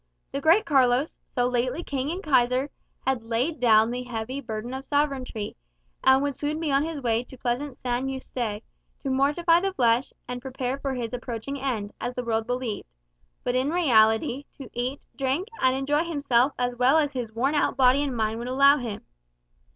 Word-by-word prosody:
The 275 - -3
great 340 +9 +5
Carlos, 265 0 +2
so 245 0 0
lately 250 +6 -1
King 275 -2 -2
and 360 +4 -4
Kaiser, 260 -1 +2 0.3
had 265 -2 +1
laid 240 +8 -1
down 225 -2 +5
the 250 +1 -3
heavy 245 +2 -4
burden 225 0 -5
of 265 +1 -5
sovereignty, 275 -7 -1 0.5
and 265 +1 +5
would 285 -1 0
soon 300 +3 -3
be 320 -3 -1
on 275 0 +3
his 315 -1 -3
way 235 -2 0
to 260 - -13
pleasant 250 +3 -2
San 250 +1 -2
Yuste, 240 -5 -4 0.4
to 275 - -2
mortify 300 +6 +3
the 390 +1 -1
flesh, 240 0 +2 0.2
and 250 0 -5
prepare 260 0 -3
for 275 -1 -2
his 240 -1 -4
approaching 245 +2 -5
end, 225 -7 -2
as 245 +1 -3
the 250 - -3
world 225 -1 -1
believed; 245 -3 -3 0.6
but 245 - 0
in 255 +3 +1
reality 245 -5 +3
to 270 -4 -10
eat, 250 +3 -3
drink, 275 - -1
and 260 0 +4
enjoy 290 +4 +1
himself 280 -5 +2
as 245 0 -1
well 255 +5 +4
as 290 -2 +1
his 245 -4 -4
worn 255 +6 0
out 295 - +1
body 260 +1 +5
and 275 -4 -2
mind 220 0 0
would 240 - -5
allow 275 +3 +5
him. 235 -6 -5
260 Hz, 190 wpm, -26 LUFS, 240-280 Hz, 0.6 s, great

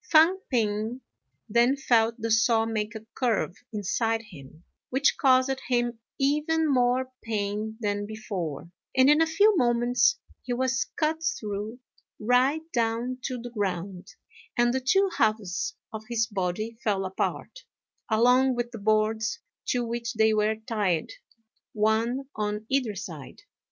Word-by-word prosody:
Fang 330 +4 +5
p'ing 220 0 -1 0.5
then 240 +5 +3
felt 230 -4 +3
the 230 0 -3
saw 225 0 +4
make 225 0 -3
a 220 0 -8
curve 225 -7 0 0.2
inside 225 +2 -1
him, 160 -5 -14 0.3
which 270 +3 +2
caused 265 0 +3
him 240 -2 0 0.2
even 300 +3 +1
more 255 -1 +2
pain 215 0 -3
than 205 -1 -1
before; 185 -8 -5 0.3
and, 260 +2 +7
in 300 +2 +4
a 325 - +4
few 405 +6 +4
moments, 240 - +3 0.2
he 245 - -3
was 255 0 0
cut 315 +1 0 0.2
through 210 +2 -5 0.4
right 255 +7 +2
down 235 +1 -1
to 255 0 -3
the 240 +1 -8
ground, 190 -3 -3 0.5
and 240 0 +3
the 265 - +1
two 385 +10 +3
halves 215 -5 0 0.2
of 220 - -5
his 230 -2 +1
body 210 +3 -3
fell 195 -3 0
apart, 190 - -3 0.5
along 250 +4 +4
with 240 0 -2
the 230 - -7
boards 215 +1 +1 0.3
to 245 -1 0
which 235 +1 -3
they 220 0 +4
were 215 +1 +2
tied, 215 -7 -1 0.6
one 225 +5 +1
on 210 0 -2
either 255 -6 0
side. 160 -7 -8
230 Hz, 140 wpm, -27 LUFS, 210-255 Hz, 0.6 s, and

